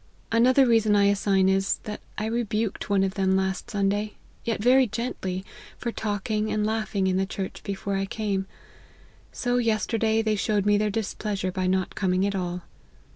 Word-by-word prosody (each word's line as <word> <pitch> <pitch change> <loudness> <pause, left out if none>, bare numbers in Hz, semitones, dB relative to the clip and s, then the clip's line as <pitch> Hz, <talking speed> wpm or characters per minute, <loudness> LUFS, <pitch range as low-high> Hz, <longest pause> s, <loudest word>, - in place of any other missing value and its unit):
Another 250 +4 +5
reason 225 -3 +4
I 200 - +4
assign 195 -1 +2
is, 195 0 +2
that 210 -1 -6 0.2
I 215 - -2
rebuked 220 -2 -2
one 200 -1 +3
of 190 -1 0
them 190 -2 +1
last 190 +4 -2
Sunday, 205 0 0 0.3
yet 230 -3 -1
very 255 +4 +5
gently, 195 -5 -4 0.3
for 235 - -3
talking 215 0 -2
and 210 0 0
laughing 215 -3 -1
in 185 0 +1
the 190 0 0
church 190 0 -5
before 200 0 -3
I 195 0 -1
came; 195 -2 -2 0.8
so 245 0 -1
yesterday 225 -1 +1
they 215 -1 +1
showed 205 0 +1
their 205 0 +3
displeasure 205 -2 -2
by 185 0 -1
not 185 0 0
coming 185 0 +1
at 200 - 0
all. 180 -2 -3
205 Hz, 170 wpm, -26 LUFS, 195-220 Hz, 0.8 s, Another